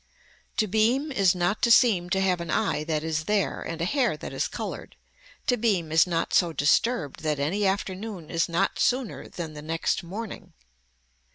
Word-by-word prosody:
To 215 - +3
beam 230 +9 +1
is 195 -8 +3
not 180 +4 0
to 235 - +3
seem 210 -7 +5
to 190 +2 +1
have 180 -2 +1
an 170 - -6
eye 195 -8 0
that 155 -2 -1
is 155 -1 -2
there 210 0 0
and 165 0 -5
a 165 - 0
hair 245 - +1
that - - -7
is - - -1
colored, - - -6 0.5
to 245 - +2
beam 195 -9 0
is 160 +2 +5
not 170 -2 -1
so 175 -2 +4
disturbed 155 - +1
that 155 -1 -1
any 190 +8 +1
afternoon 190 -2 -3
is 165 +1 0
not 175 +4 0
sooner 255 -3 0
than 165 -3 -6
the 150 - -8
next 160 +4 -1
morning. 195 +5 -7
180 Hz, 185 wpm, -26 LUFS, 165-215 Hz, 0.5 s, seem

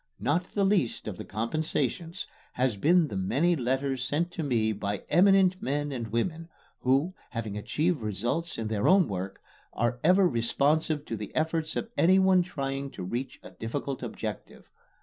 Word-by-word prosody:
Not 170 +5 +1
the 200 -1 +2
least 190 - +1
of 100 -4 -4
the - - -6
compensations 155 - -2 0.3
has 125 -3 +1
been 165 - +4
the - - -5
many 140 - +2
letters 130 -1 -1
sent 165 +6 -1
to 170 - -4
me 115 -7 +1
by 100 -1 -3
eminent 185 +1 +5
men 145 +2 -1
and 120 -4 -4
women, 160 - -2 0.3
who, 135 +8 +2 0.2
having 115 -4 -4
achieved 150 +8 0
results 120 - -2
in 115 - -3
their 105 -2 0
own 185 -2 +5
work, 95 0 -5 0.3
are 120 +2 0
ever 185 +3 +5
responsive 145 +4 +1
to 115 - -4
the 105 -2 -6
efforts 160 0 0
of 230 - -3
anyone 190 +1 +5
trying 140 -5 -3
to - - -8
reach 120 +8 -4
a - - -11
difficult 135 +4 -4
objective. - - -6
140 Hz, 165 wpm, -28 LUFS, 115-170 Hz, 0.3 s, eminent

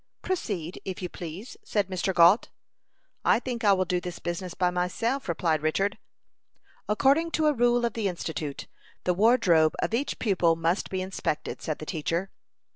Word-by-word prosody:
"Proceed, 195 - -3
if 190 -2 -5
you 180 - -3
please," 175 +8 -8
said 205 -3 0
Mr. 185 0 -1
Gault. 175 +4 +5 0.7
"I - - +4
think 245 -2 -4
I 205 - +6
will 185 -1 +1
do 180 0 -1
this 175 -1 -6
business 175 +1 -4
by 180 -1 +1
myself," 185 +8 -1
replied 160 -2 +1
Richard. 195 +6 0 0.9
"According 280 +10 +3
to 315 - +1
a 300 - +4
rule 240 -1 +3
of 235 - -1
the 220 -3 -1
Institute, 160 -5 -4 0.4
the 180 - +2
wardrobe 180 -7 +4
of - - -2
each 265 +5 -1
pupil 180 -7 +2
must 165 +3 0
be 190 -1 -2
inspected," 185 -5 -3
said 155 - -3
the 155 - -8
teacher. 165 +4 -2
185 Hz, 170 wpm, -27 LUFS, 170-230 Hz, 0.9 s, I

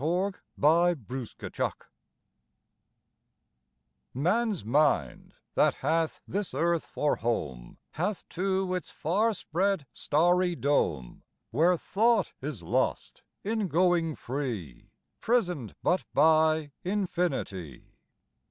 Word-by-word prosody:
_ 180 +6 0 0.2
THE 170 +4 +4
EXCELLENT 125 -1 -7 0.2
WAY - - -33 2.3
Man's 195 - +1
mind 145 +6 +1 0.2
that - - +3
hath 160 +3 0
this 200 -1 -3
earth 170 0 +1
for 150 - 0
home 70 - -3
Hath 185 +6 -3
too 190 0 -1
its 180 -2 -3
far 200 +9 +1
spread 190 -2 -1
starry 175 +3 +2
dome 80 - 0 0.3
Where 170 +8 +3
thought 225 +7 +2
is 130 - -5
lost 85 - -1 0.2
in 215 -1 -1
going 170 -2 +2
free, 120 - -5 0.3
Prison'd 180 - 0
but 180 - +2
by 155 -1 +4
infinity. 170 - -2
165 Hz, 95 wpm, -28 LUFS, 140-185 Hz, 2.3 s, THE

